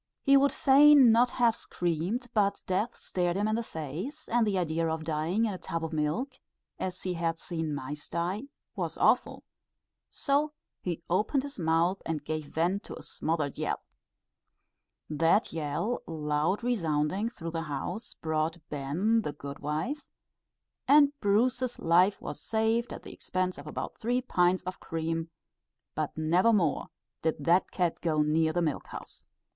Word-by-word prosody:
He 275 - +6
would 275 +1 +5
fain 280 -2 +7
not 240 +2 +5
have 235 -3 +2
screamed, 175 +9 -2
but 200 -2 +1
death 205 +6 -1
stared 175 -1 -1
him 205 +1 +1
in 215 - 0
the 230 - 0
face, 180 - -6
and 235 -1 +3
the 200 -2 +1
idea 165 -2 0
of 160 0 -2
dying 160 +8 0
in 210 - -1
a 185 - -6
tub 165 -1 -3
of 160 - -6
milk, 185 - -1 0.4
as 185 -1 -4
he 185 - -1
had 165 -1 -1
seen 160 -4 -3
mice 145 +2 -6
die, 180 +8 -2 0.3
was - - -3
awful; - - +2 0.7
so 295 +1 0 0.3
he 170 -2 -4
opened 210 +10 +1
his 280 -6 -7
mouth 165 +3 +2
and 155 -3 -3
gave 155 0 -3
vent 175 +7 0
to - - -7
a - - -10
smothered 155 -3 -2
yell. - - -1 1.3
That 165 +7 +2
yell, 165 +10 -2
loud 155 +6 -1
resounding 190 -2 0
through 165 -8 -7
the 165 0 -2
house, 165 - -5
brought 160 +1 -1
"ben" 160 +11 +1
the 150 -8 -4
good 140 -1 -8
wife, 160 - -3 0.8
and 285 0 +6
Bruce's 245 +5 +2
life 180 +4 +3
was - - -7
saved 225 +2 0
at - - -7
the - - -9
expense 185 -3 -2
of 145 - -10
about - - -5
three 245 +3 0
pints 180 -5 +2
of 185 0 -6
cream; 165 0 -3 0.6
but - - -3
never 175 +8 +3
more 180 -9 +1 0.3
did 160 -1 -1
that 175 +2 +4
cat 175 -3 -1
go 155 -3 +2
near 160 +1 +2
the 175 +2 0
milk 155 -4 -2
house. - - -10
175 Hz, 160 wpm, -29 LUFS, 160-225 Hz, 1.3 s, fain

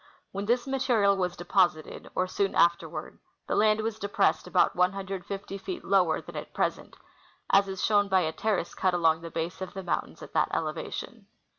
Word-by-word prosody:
When 200 +1 -4
this 240 +1 +2
material 245 -7 +2
was 180 -2 -1
deposited, 175 -3 0
or 185 - +2
soon 195 +1 -1
afterward, 170 0 +1 0.3
the - - -2
land 215 0 +3
Avas 220 0 -3
depressed 200 0 +1
about - - +3
150 195 +1 -2
feet 360 - -6
lower 180 -5 +3
than - - -11
at - - -7
present, - - -2 0.5
as 195 0 +5
is 190 -1 -2
shown 205 -1 +3
by 190 -1 +3
a 160 -2 0
terrace 195 -3 -1
cut 185 -1 +1
along 165 -2 +3
the 165 - -7
base 165 +2 -4
of 190 - -6
the 190 - -5
mountains 175 - -3
at - - -12
that - - +2
elevation. - - -4
195 Hz, 180 wpm, -28 LUFS, 175-205 Hz, 0.5 s, as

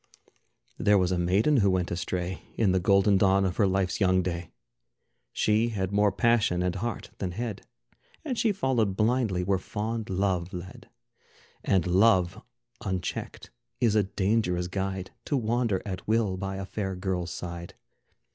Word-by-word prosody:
There 105 0 +4
was 90 -1 +2
a 90 - 0
maiden 100 +12 +3
who 100 -4 +4
went 90 -2 0
astray 90 +1 -3
In 105 -5 +2
the 95 - +2
golden 100 +2 +4
dawn 95 0 +4
of 90 -1 -2
her 100 - +4
life's 95 -1 0
young 95 -1 +3
day. 85 -1 -4 0.8
She 110 +2 +2
had 95 -4 -2
more 105 0 +3
passion 105 -4 +2
and 90 -1 0
heart 110 +4 -4
than 90 -3 -3
head, 110 0 -5 0.6
And 265 -5 -2
she 225 -1 +2
followed 125 - 0
blindly 110 -5 +1
where 95 0 +1
fond 110 +3 -4
Love 95 -2 -1
led. 90 +1 -9 0.7
And 95 -4 +2
Love 95 -1 +3 0.4
unchecked 95 -3 -4 0.3
is 115 -3 +3
a 110 - +4
dangerous 95 -2 0
guide 95 0 -3
To 145 - 0
wander 115 -4 0
at 95 -3 -6
will 110 -3 +1
by 95 +1 -4
a 95 0 -4
fair 95 -1 -3
girl's 90 -1 -2
side. 85 0 -7
95 Hz, 155 wpm, -27 LUFS, 90-110 Hz, 0.8 s, There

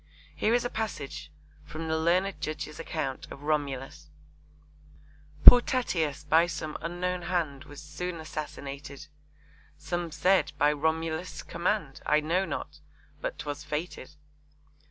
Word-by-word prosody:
Here 225 +2 +2
is 245 - +1
a - - 0
passage 215 -11 -4 0.3
from 160 +1 -6
the 160 - +1
learned 180 +5 +1
judge's 155 0 -4
account 150 -5 -3
of 140 - -10
Romulus: 140 -3 -2 1.4
Poor 245 - +13
Tatius 170 - -1
by 160 +3 +4
some 155 -2 -5
unknown 175 +2 -2
hand 170 -6 -2
Was 145 +1 -11
soon 170 +4 -4
assassinated, 145 -2 -7 0.7
Some 170 +3 -3
said 185 +5 +3
by 150 +1 +4
Romulus' 160 +3 -2
command; 170 -6 -2
I 150 - +3
know 170 +5 +1
not - - -5 0.4
but - - -3
'twas 145 0 -5
fated. 150 -2 -5
160 Hz, 125 wpm, -29 LUFS, 150-180 Hz, 1.4 s, Poor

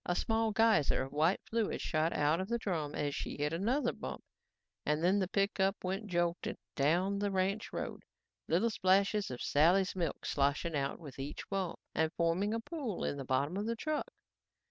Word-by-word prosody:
A 175 - -1
small 225 +2 +1
geyser 220 -12 +3
of 135 - -7
white 160 +6 +2
fluid 225 -2 0
shot 160 0 +1
out 150 +4 +2
of 190 - -4
the 235 - +1
drum 165 -10 -2
as 145 -1 -1
she - - -4
hit 150 +2 -1
another 235 - +1
bump - - -6 0.6
and 150 +2 0
then 190 +3 +4
the 190 - +1
pickup 195 0 +1
went 195 +3 -2
jolting 175 -1 -1 0.2
down 175 +8 +2
the 205 0 0
ranch 195 +2 0
road, - - -4 0.5
little 230 - +2
splashes 195 +1 +2
of 125 -1 -5
Sally's 180 +7 +3
milk 175 -3 -2
sloshing 145 +3 +1
out 140 -1 -1
with 145 -5 -11
each 140 +2 -5
bump 195 -3 -2
and 160 0 +1
forming 170 +5 +1
a 230 - 0
pool 245 - -4
on 145 - -2
the 135 - -4
bottom 140 +6 0
of 205 +2 -2
the 230 - 0
truck. 305 +5 -2
185 Hz, 190 wpm, -33 LUFS, 155-205 Hz, 0.6 s, then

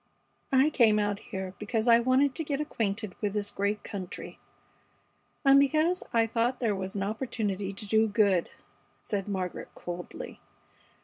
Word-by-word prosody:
"I 270 +3 +4
came 225 -6 +5
out 205 -1 0
here 190 -1 -6
because 220 +2 -1
I 235 0 +7
wanted 260 +3 +3
to 320 - -3
get 285 -2 -2
acquainted 215 -8 -2
with 205 -2 -1
this 205 -1 -1
great 205 +1 -1
country, 190 -3 -7 1.1
and 275 0 +8
because 310 +6 +2
I 230 -1 +3
thought 235 +3 0
there 225 -5 +1
was 190 0 -5
an 195 - -1
opportunity 205 -3 -2
to 205 +2 -7
do 220 +2 +4
good," 200 -4 +2 0.5
said 200 -2 -3
Margaret, 185 -3 -3
coldly. 175 0 -7
215 Hz, 150 wpm, -29 LUFS, 200-250 Hz, 1.1 s, and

